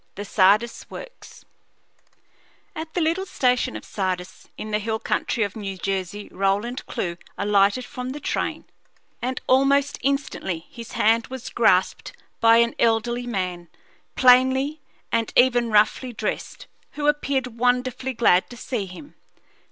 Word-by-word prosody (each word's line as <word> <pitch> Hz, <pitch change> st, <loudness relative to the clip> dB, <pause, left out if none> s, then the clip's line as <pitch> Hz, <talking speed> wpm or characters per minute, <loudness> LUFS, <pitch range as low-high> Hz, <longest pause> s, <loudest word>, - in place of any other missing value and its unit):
THE 205 Hz, -, -6 dB
SARDIS 205 Hz, +4 st, +2 dB
WORKS -, -, -11 dB, 1.3 s
At 320 Hz, 0 st, -7 dB
the 355 Hz, -, +1 dB
little 335 Hz, +5 st, 0 dB
station 250 Hz, -5 st, +1 dB
of -, -, -7 dB
Sardis, 185 Hz, -2 st, -4 dB
in 215 Hz, -, -6 dB
the 210 Hz, -, +1 dB
hill 220 Hz, +1 st, -2 dB
country 225 Hz, +1 st, -1 dB
of 200 Hz, -2 st, -4 dB
New 195 Hz, -3 st, -5 dB
Jersey, 195 Hz, +1 st, -3 dB
Roland 200 Hz, +6 st, -1 dB
Clewe 170 Hz, -2 st, -3 dB, 0.2 s
alighted 205 Hz, +4 st, +2 dB
from 250 Hz, 0 st, -6 dB
the 280 Hz, +3 st, -5 dB
train, -, -, -2 dB, 0.6 s
and 255 Hz, +1 st, -2 dB
almost 275 Hz, +2 st, +3 dB
instantly 265 Hz, -, -2 dB
his 235 Hz, -2 st, -10 dB
hand 225 Hz, +1 st, +2 dB
was 260 Hz, -1 st, -7 dB
grasped 190 Hz, -5 st, +2 dB, 0.3 s
by 230 Hz, 0 st, +6 dB
an 235 Hz, 0 st, +3 dB
elderly 235 Hz, +2 st, +1 dB
man, 180 Hz, -6 st, -3 dB, 0.5 s
plainly 260 Hz, +4 st, +4 dB, 0.3 s
and 230 Hz, -1 st, 0 dB
even 245 Hz, -2 st, +4 dB
roughly 215 Hz, +4 st, +2 dB
dressed, 215 Hz, -1 st, -4 dB, 0.3 s
who 295 Hz, -, -4 dB
appeared 270 Hz, -5 st, 0 dB
wonderfully 250 Hz, +1 st, 0 dB
glad 190 Hz, -6 st, +3 dB
to 245 Hz, -, -10 dB
see 230 Hz, -5 st, -3 dB
him. 235 Hz, +11 st, -12 dB
235 Hz, 135 wpm, -23 LUFS, 205-260 Hz, 1.3 s, by